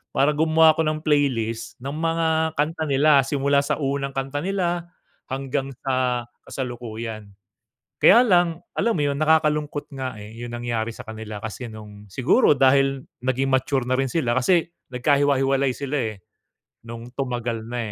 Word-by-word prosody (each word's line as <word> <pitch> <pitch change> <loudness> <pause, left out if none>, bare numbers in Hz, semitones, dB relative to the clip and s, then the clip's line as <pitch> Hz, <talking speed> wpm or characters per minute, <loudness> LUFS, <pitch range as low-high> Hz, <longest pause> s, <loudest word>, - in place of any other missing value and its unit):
para 140 +3 +4
gumawa 160 +1 +5
ako - - 0
ng 155 0 -1
playlist 115 -7 0
ng 140 - -4
mga 160 0 0
kanta 160 +2 0
nila. 140 +1 +5
Simula 140 +1 +1
sa - - 0
unang 140 0 -2
kanta 135 +2 -2
nila, 175 -3 -1 0.4
hanggang 135 0 -2
sa 130 -2 0 0.2
kasalukuyan. 115 -4 -6 0.7
Kaya 240 +4 +7
lang, 175 -4 +3 0.2
alam 230 -8 +1
mo - - +1
yun, 140 - 0
nakakalungkot 150 -1 +1
nga 130 -4 -5
eh, 105 +2 -10
yung 120 +1 -7
nangyari 120 -1 -3
sa - - -10
kanila 110 -1 -7
kasi 110 +2 -7
nung 105 -2 -12
siguro 135 - +3
dahil 135 0 +3 0.2
naging 130 +1 0
mature 130 -1 +1
na 130 - +1
rin 135 -1 0
sila. 125 -8 0
Kasi, 165 +7 +3 0.2
nagkahiwa-hiwalay 135 0 +2
sila 140 +2 -4 0.2
eh, - - -9 0.7
nung 115 0 -9
tumagal 120 -4 -3
na 120 +2 -5
135 Hz, 150 wpm, -23 LUFS, 120-150 Hz, 0.7 s, Kaya